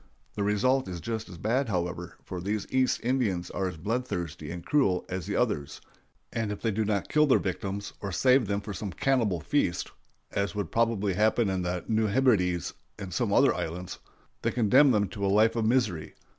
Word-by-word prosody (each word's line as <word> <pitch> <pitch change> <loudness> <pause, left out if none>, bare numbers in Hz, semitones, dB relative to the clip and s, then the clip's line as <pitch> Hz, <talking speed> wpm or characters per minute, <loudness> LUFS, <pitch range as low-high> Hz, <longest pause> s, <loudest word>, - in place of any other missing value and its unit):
The 105 - -4
result 130 +6 +2
is 90 -2 -5
just 110 +5 -4
as 90 - -9
bad, 115 +8 0
however; 90 -2 -3
for 90 -2 -6
these 105 +3 -2
East 130 -1 +2
Indians 110 -9 0
are 95 - -1
as 90 -3 -6
bloodthirsty 90 -6 -3
and 85 0 -7
cruel 100 -12 +2
as 95 -2 -4
the - - -2
others, 70 0 -1 0.5
and 110 -3 -1
if 105 - -5
they 115 - 0
do 110 +2 0
not 100 -2 -1
kill 150 0 +3
their 135 - +5
victims, 100 +2 -4
or 100 - -4
save 125 +6 +4
them 100 0 -1
for 105 0 -6
some 100 +1 -5
cannibal 115 - +1
feast 85 - 0 0.4
(as 100 +1 -1
would 100 -6 -3
probably 110 -4 +1
happen 110 +2 +2
in 95 -1 -1
the 90 0 -3
New 110 -1 +2
Hebrides 100 -7 +2 0.2
and 95 -3 -7
some - - 0
other - - +5
islands), 90 +3 -5 0.4
they - - +1
condemn 125 +5 +5
them 105 -5 +2
to 100 +2 -6
a - - +2
life 110 +3 +4
of 115 -2 +1
misery. 110 -10 0
100 Hz, 200 wpm, -28 LUFS, 90-115 Hz, 0.5 s, their